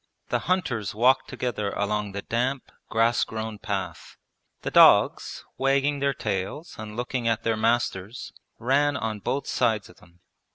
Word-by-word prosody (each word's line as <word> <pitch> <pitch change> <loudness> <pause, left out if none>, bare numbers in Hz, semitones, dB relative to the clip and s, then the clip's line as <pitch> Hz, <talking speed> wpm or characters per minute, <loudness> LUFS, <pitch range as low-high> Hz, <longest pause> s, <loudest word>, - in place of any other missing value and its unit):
The - - +1
hunters 120 - 0
walked 130 +4 +3
together 110 -5 -2
along 105 0 -1
the 100 - -5
damp, 125 +3 -2 0.2
grass 115 +1 +3
grown 110 -1 -5
path. - - -5 0.5
The - - -3
dogs, - - +5
wagging 140 +2 +2
their 140 0 +2
tails 105 - -4
and 110 0 -7
looking 120 -1 -2
at 115 -1 0
their 115 0 +1
masters, 110 -1 -1 0.2
ran 140 +4 +2
on 110 -3 -3
both 135 +6 -2
sides 110 -4 0
of 90 - -17
them. 85 0 -22
115 Hz, 150 wpm, -26 LUFS, 105-130 Hz, 0.5 s, dogs